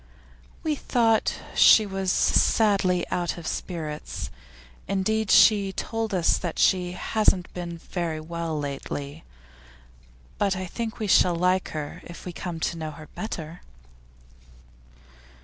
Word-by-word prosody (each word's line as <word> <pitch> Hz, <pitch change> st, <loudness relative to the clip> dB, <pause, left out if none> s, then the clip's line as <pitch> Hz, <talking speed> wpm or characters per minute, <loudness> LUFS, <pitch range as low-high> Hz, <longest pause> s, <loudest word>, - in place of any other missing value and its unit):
'We 310 Hz, -2 st, 0 dB
thought 225 Hz, -5 st, +2 dB, 0.2 s
she 215 Hz, -, +7 dB
was 195 Hz, -2 st, -1 dB
sadly 195 Hz, -6 st, +3 dB
out 175 Hz, -1 st, -1 dB
of 170 Hz, -, -9 dB
spirits. 155 Hz, -4 st, -5 dB, 0.6 s
Indeed 215 Hz, +2 st, 0 dB
she 200 Hz, -3 st, +5 dB
told 225 Hz, +1 st, -3 dB
us 180 Hz, -4 st, +2 dB
that 175 Hz, -3 st, -4 dB
she 180 Hz, -2 st, +2 dB
hasn't 190 Hz, -1 st, +1 dB
been 175 Hz, -1 st, -5 dB
very 165 Hz, -2 st, -4 dB
well 165 Hz, 0 st, -4 dB
lately. 145 Hz, +1 st, -5 dB, 1.2 s
But 200 Hz, -2 st, +2 dB
I 185 Hz, 0 st, -4 dB
think 225 Hz, +5 st, -5 dB
we 215 Hz, -, -3 dB
shall 180 Hz, -3 st, +4 dB
like 180 Hz, +2 st, +1 dB
her 150 Hz, -2 st, -6 dB
if 170 Hz, -, -11 dB
we 180 Hz, -, -6 dB
come 170 Hz, -1 st, -5 dB
to 170 Hz, -, -1 dB
know 155 Hz, -1 st, -4 dB
her 155 Hz, 0 st, -11 dB
better. 170 Hz, -6 st, -6 dB
180 Hz, 130 wpm, -25 LUFS, 165-200 Hz, 1.2 s, she